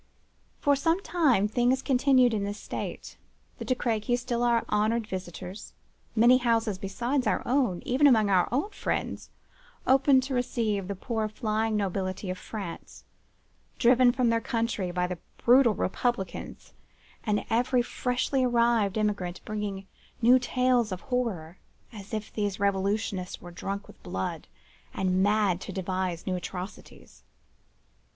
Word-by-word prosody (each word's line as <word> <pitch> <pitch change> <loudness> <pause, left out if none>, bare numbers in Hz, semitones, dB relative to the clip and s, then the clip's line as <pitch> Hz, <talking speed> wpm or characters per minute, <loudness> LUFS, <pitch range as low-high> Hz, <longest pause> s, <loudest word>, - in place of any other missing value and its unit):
For 285 0 +3
some 325 +6 +1
time 270 - +2
things 245 +4 +1
continued 255 -2 +4
in 205 -2 -1
this 205 +1 -3
state—the - - -8
De 255 - +1
Crequys 235 0 0
still 240 -1 -2
our 235 -1 +2
honoured 220 +2 +1
visitors,—many 195 +6 -1
houses 225 -5 +1
besides 240 +8 -1
our - - +1
own, 245 -9 +1
even 270 +4 +4
among 220 -6 +5
our 185 -3 +3
own 290 - 0
friends, - - -3 0.6
open 270 +1 +5
to 265 +1 -4
receive 220 -6 -1
the 200 - -3
poor 220 +2 -2
flying 215 +1 -1
nobility 190 -1 -2
of 185 - -6
France, 195 -6 -8 0.7
driven 245 0 +5
from 245 -1 +1
their 230 0 +1
country 225 -6 -1
by 180 0 -1
the 180 -1 -5 0.2
brutal 240 -2 +5
republicans, 190 -1 -3 0.5
and 210 -2 0
every 245 +2 +2
freshly 250 +2 -1
arrived 235 -4 +2
emigrant 200 -4 -1
bringing 205 -2 -4 0.3
new 245 +2 +6
tales 250 -3 +1
of 185 - -4
horror, 210 -10 -3 0.3
as 205 -2 -10
if 215 -2 -4
these 205 -2 -2
revolutionists 200 -1 -1
were 175 - -11
drunk 195 +3 -5
with - - -17
blood, 95 +1 -4 0.5
and 185 -1 +1
mad 205 -3 +2
to - - -6
devise 185 -2 -3
new 185 - -1
atrocities. 180 +2 -8
215 Hz, 135 wpm, -28 LUFS, 195-245 Hz, 0.7 s, new